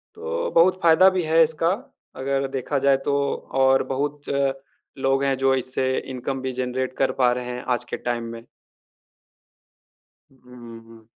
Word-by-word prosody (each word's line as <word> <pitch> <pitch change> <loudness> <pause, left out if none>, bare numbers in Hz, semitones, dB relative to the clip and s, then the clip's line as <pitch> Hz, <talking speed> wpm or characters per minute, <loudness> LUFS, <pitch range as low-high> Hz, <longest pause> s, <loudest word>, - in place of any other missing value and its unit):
तो 480 +2 -3
बहुत 185 +2 +4
फ़ायदा 170 +3 +6
भी 185 -1 -1
है 160 +1 +4
इसका, 160 +1 +1 0.5
अगर 135 +1 -1
देखा 135 +2 -2
जाए 135 0 +4
तो, 145 - 0 0.4
और 135 0 +3
बहुत 145 +2 -2 0.8
लोग 135 +1 +1
हैं 135 -1 +1
जो 135 0 +3
इससे 130 0 -1
इनकम 130 +1 -5
भी 130 0 -3
जनरेट 130 +1 -3
कर 130 -1 +2
पा 125 - +5
रहे 125 0 -3
हैं 125 0 -5
आज 120 - -8
के - - 0
टाइम 120 -1 -3
में। 115 0 -9 1.9
हुँ, 125 -3 -13
हुँ। 115 -1 -16
135 Hz, 155 wpm, -23 LUFS, 125-145 Hz, 1.9 s, फ़ायदा